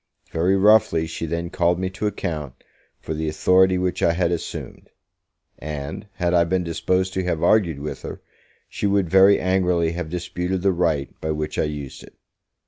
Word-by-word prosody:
Very 90 +4 +2
roughly 95 -5 +4
she 80 +1 -5
then 85 +2 -3
called 85 0 +1
me 95 0 -2
to 100 +3 -2
account 75 -9 -4 0.4
for 80 - -5
the 80 0 -2
authority 95 +4 +3
which 90 0 -1
I 85 - +3
had 85 0 0
assumed; 85 - -6 0.7
and, 75 +5 -6
had 90 -1 0
I 85 -1 +5
been 90 +2 0
disposed 90 +3 -1
to 95 - -1
have 85 -3 -1
argued 90 -9 +3
with 75 +2 -6
her, - - -7 0.5
she 105 - -2
would 100 -4 +1
very 95 +1 +6
angrily 90 -3 +1
have 85 -1 -5
disputed 90 +1 -3
the 100 -1 +3
right 80 -5 0
by 80 - -3
which 75 0 -3
I - - +2
used 75 -3 -6
it. - - -15
85 Hz, 180 wpm, -22 LUFS, 80-95 Hz, 0.7 s, very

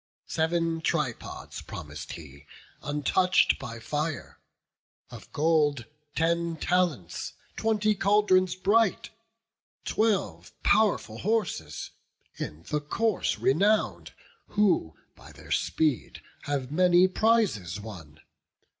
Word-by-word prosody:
Sev'n 165 0 0
tripods 150 -8 -3
promis'd - - -8
he, 70 -4 -12 0.3
untouch'd 150 +6 +2
by 115 -4 -7
fire, 150 +3 -4 0.7
Of - - -11
gold, 150 -5 +2 0.3
ten 170 0 +1
talents, 160 - -1 0.2
twenty 215 -1 +1
caldrons 195 -3 +3
bright, 205 +2 +2 0.7
Twelve 145 - 0
pow'rful 200 - +2
horses, 185 - -2 0.5
in 75 +2 -6
the 150 -1 0
course 210 +8 0
renown'd. 200 +10 +1 0.3
Who 195 - +1 0.2
by - - -15
their - - -13
speed 150 -7 0 0.2
have 140 -2 -2
many 180 +2 +5
prizes 185 - +1
won. 80 -8 -10
165 Hz, 95 wpm, -27 LUFS, 125-195 Hz, 0.7 s, many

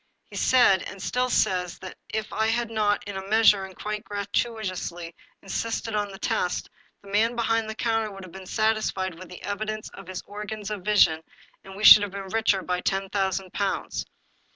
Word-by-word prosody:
He - - -10
said, 245 -8 +4
and 195 - -9
still 250 +6 0
says, 180 -6 +1
that 185 - -9
if 220 0 -3
I 220 0 +1
had 230 0 0
not, 210 -2 +1
in 200 -1 -7
a 190 0 -6
measure, 210 -3 +5
and 190 -1 -12
quite 210 0 -4
gratuitously, 200 -5 -3 0.3
insisted 225 +3 -3
on 205 -1 -1
a 195 - -9
test, 180 -1 -1 0.3
the 200 - -12
man 225 +4 +2
behind 225 -1 0
the 220 - -5
counter 225 -1 0
would 195 -1 -10
have 185 - -11
been 190 -1 -10
satisfied 215 -4 0
with 185 - -10
the 180 - -11
evidence 215 +1 -4
of 195 - -12
his 185 -1 -6
organs 210 0 -6
of 210 -2 -4
vision, 180 -5 +4 0.4
and 195 0 -11
we 205 - -7
should 215 - +11
have 205 -2 -3
been 195 -1 -6
richer 210 -3 +1
by 180 0 -1
ten 195 +1 -1
thousand 190 -2 -1
pounds. 200 -1 -2
205 Hz, 195 wpm, -26 LUFS, 190-220 Hz, 0.4 s, should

